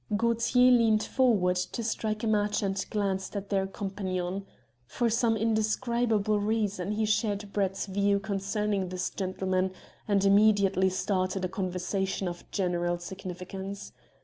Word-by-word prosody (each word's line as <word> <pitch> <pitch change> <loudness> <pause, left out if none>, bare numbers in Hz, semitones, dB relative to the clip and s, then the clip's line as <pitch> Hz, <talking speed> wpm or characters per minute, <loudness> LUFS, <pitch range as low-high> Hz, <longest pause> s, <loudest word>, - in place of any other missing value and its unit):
Gaultier 235 +2 +3
leant 225 -3 +4
forward 205 -9 +2
to 180 +6 -3
strike 215 -1 -2
a - - 0
match 210 0 +1
and 195 -1 -1
glanced 195 -2 -2
at 200 0 -4
their 195 -1 +1
companion. 190 -1 -4 0.4
For 235 - 0
some 230 0 +2
indescribable 220 -1 +1
reason 205 -2 -1
he 215 +1 0
shared 210 -2 -1
Brett's 195 -1 0
views 200 0 +1
concerning 200 -1 -1
this 185 0 -3
gentleman, 185 -1 -1 0.3
and 200 -2 +2
immediately 200 -2 +4
started 185 0 -1
a - - -3
conversation 190 0 -2
of 175 0 -7
general 175 -2 0
significance. 190 +2 -7
200 Hz, 130 wpm, -28 LUFS, 190-215 Hz, 0.4 s, leant